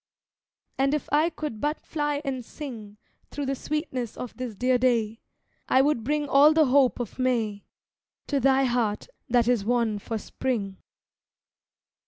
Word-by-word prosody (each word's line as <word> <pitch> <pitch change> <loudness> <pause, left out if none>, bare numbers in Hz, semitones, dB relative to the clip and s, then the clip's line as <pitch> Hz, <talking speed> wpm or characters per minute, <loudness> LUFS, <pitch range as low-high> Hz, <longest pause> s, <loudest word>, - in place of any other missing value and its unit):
And 275 +2 +3
if 300 - -4
I 310 +3 +4
could 300 -9 -6
but 300 +1 -1
fly 295 -1 -2
and 260 -2 -3
sing 225 -7 -9 0.3
Thro' 290 - -4
the 270 - -1
sweetness 270 -5 -4
of 250 - -7
this 250 -4 -5
dear 250 +3 +2
day, 230 -3 +1 0.5
I 260 - +5
would 285 -5 +1
bring 295 +3 0
all 285 +3 +6
the 315 -1 +5
hope 265 -1 +3
of 240 +1 -6
May, 225 -5 0 0.6
To 285 - 0
thy 270 +1 +3
heart, 240 -5 0 0.2
that 240 -1 +3
is 245 -5 +2
wan 230 -2 +1
for 225 +2 -4
Spring. 210 -4 -3
255 Hz, 155 wpm, -26 LUFS, 230-285 Hz, 0.6 s, all